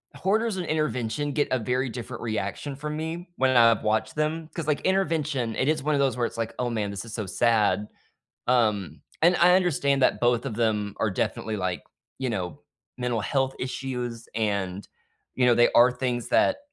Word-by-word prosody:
Hoarders 215 +1 0
and 180 - -3
Intervention 145 -3 -1
get 145 0 +1
a 130 - +2
very 125 +3 -1
different 120 +1 -7
reaction 110 +5 -3
from 150 +2 -5
me 165 +3 -5
when 130 -1 +2
I've 115 -2 +5
watched 110 0 0
them, 155 +1 -1
'cause, 165 -3 -4
like, 150 -2 +1
Intervention, 155 - 0
it 130 - 0
is 155 -2 +1
one 150 +1 +1
of - - +1
those 135 -2 +2
where 120 - +1
it's, - - -6
like, 115 -1 -3
"Oh, 125 -1 0
man, 110 -3 -2
this 100 +3 -6
is 115 - -9
so 110 - -3
sad," 105 -1 +2 0.6
um, 105 - +1 0.2
and 175 +2 +5
I 180 +1 +6
understand 140 -7 +1
that - - +3
both 120 +1 +2
of 125 - -3
them 105 -3 0
are 110 - +1
definitely, 110 +3 -2
like, 95 -2 -2 0.4
you 130 -2 -1
know, 90 -8 -4 0.4
mental 125 -2 -1
health 135 +3 0
issues 125 -3 -4
and, 100 -3 -2 0.5
you 125 - +2
know, 120 - +6
they 120 +1 +5
are 120 +2 +6
things 125 -2 -2
that 285 - +3
125 Hz, 195 wpm, -26 LUFS, 110-150 Hz, 0.6 s, I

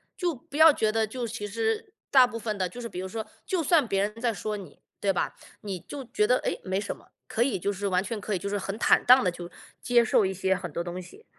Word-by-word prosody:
就 350 -4 -1
不 270 +3 -10
要 320 0 +9
觉 220 -6 +1
得 220 0 +1
就 240 +2 -4
其 215 -2 -5
实 225 - -2 0.2
大 260 -2 +7
部 235 -2 -6
分 220 -2 -3
的 185 -2 -1
就 245 - -10
是 240 - -4
比 180 - -7
如 190 - -4
说， 220 +3 -5 0.2
就 360 -3 0
算 310 -4 +4
别 195 -2 +1
人 210 +3 -4
在 240 -1 +2
说 215 0 -4
你， 185 -7 -11 0.2
对 200 - +2
吧？ 180 - -2 0.3
你 195 -3 -4
就 270 - -8
觉 210 -3 +1
得： 250 - +4
“诶， - - -2
没 190 0 -1
什 205 - -4
么。” - - -20 0.2
可 225 - -2
以 250 -2 +2
就 200 +3 -1
是 200 +1 -3
完 185 -1 +1
全 210 +1 -4
可 205 0 -2
以 - - +1
就 190 - -5
是 205 0 -1
很 195 +1 -4
坦 - - +4
荡 255 +2 +8
地 180 - +2
去 175 0 -8 0.3
接 240 -1 +4
受 220 - +4
一 190 - +1
些 190 0 +1
很 180 -3 -6
多 170 - -3
东 175 +1 -5
西， 415 - -15
210 Hz, 300 characters per minute, -27 LUFS, 190-245 Hz, 0.3 s, 要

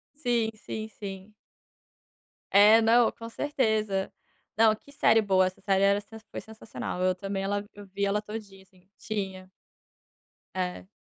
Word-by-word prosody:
Sim, 240 -6 0
sim, 215 0 -6
sim. 195 0 -9 1.2
É, 210 +3 +7
não, 230 +1 +5
com 230 0 -9
certeza. 220 -8 0 0.5
Não, 220 -1 +5
que 280 +6 -19
série 225 -6 +4
boa, 190 -2 +3
essa 185 - -5
série 195 -1 +2
era 200 +1 +4
sen 220 +2 -12
foi - - -5
sensacional. 220 -4 -6
Eu 185 0 +3
também 195 +1 -4
ela 205 +1 -1
eu 205 0 -11
vi 200 +1 -2
ela 205 +1 +1
todinha, 210 -3 -9
assim, 185 0 -27
tinha 190 -3 -5 1.0
É. 185 0 -4
205 Hz, 145 wpm, -28 LUFS, 195-220 Hz, 1.2 s, É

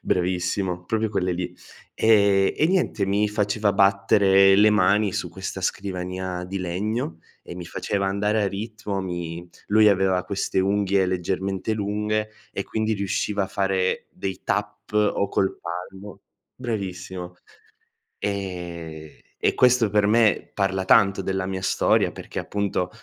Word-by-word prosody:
Bravissimo, 90 0 -1
proprio 110 +3 0
quelle 95 -3 -1
lì. 90 0 -4 0.4
Ehm 100 -3 +4
e 155 - +3
niente 175 - +1
mi 105 +2 +1
faceva 105 0 0
battere 100 0 +5
le 105 +1 +6
mani 100 0 +3
su - - -3
questa - - -6
scrivania 90 -1 -3
di 95 +2 -4
legno 90 -1 -3 0.2
e - - -9
mi 90 - -7
faceva 100 +3 -2
andare 105 +2 +1
a 100 - +1
ritmo, 105 0 -4
mi 85 -2 -5 0.2
lui 110 +1 +6
aveva 95 -2 +2
queste 100 -1 -2
unghie 100 0 +2
leggermente 95 +2 -2
lunghe 105 +1 -1 0.2
e 100 - -2
quindi 110 0 -1
riusciva 100 0 -1
a - - -6
fare 95 -1 -1
dei 95 -1 -5
tap - - -3
o 105 -1 +2
col 95 0 0
palmo 95 +4 -7 0.3
bravissimo. 95 -6 -5 0.8
E 85 -6 -5 0.2
e - - +1
questo 125 -3 +4
per 105 0 +3
me 110 0 +3
parla 95 -1 0
tanto 100 -1 +4
della 95 0 -2
mia 95 0 -4
storia 95 - +2
perché, - - -7
appunto, 100 -3 -2
95 Hz, 140 wpm, -24 LUFS, 90-105 Hz, 0.8 s, le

